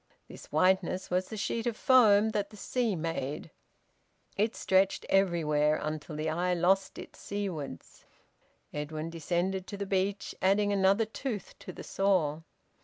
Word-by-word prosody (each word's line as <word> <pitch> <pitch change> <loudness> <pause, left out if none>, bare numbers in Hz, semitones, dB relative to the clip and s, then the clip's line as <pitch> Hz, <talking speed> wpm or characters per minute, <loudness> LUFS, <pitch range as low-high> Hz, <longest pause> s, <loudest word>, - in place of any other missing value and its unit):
This - - -12
whiteness 185 +3 +1
was 185 +1 +1
the 220 - -6
sheet 225 +3 -2
of 230 -2 -2
foam 220 -5 +5
that 205 -2 -2
the 210 - -14
sea 235 -1 -1
made. 160 -4 -4 0.8
It 215 +3 0
stretched 190 0 +2
everywhere, 155 -6 +2
until 155 0 -5
the 155 +1 -2
eye 175 +3 0
lost 190 +3 +2
it - - -10
seawards. 185 - -6 0.7
Edwin 155 +2 -4
descended 175 +3 -2
to 200 - -6
the 200 - -3
beach, 195 +1 -1
adding 205 +2 +3
another 195 +3 +3
tooth 220 -2 -5
to - - -8
the - - -10
saw. 180 -6 +1
190 Hz, 145 wpm, -30 LUFS, 165-205 Hz, 0.8 s, foam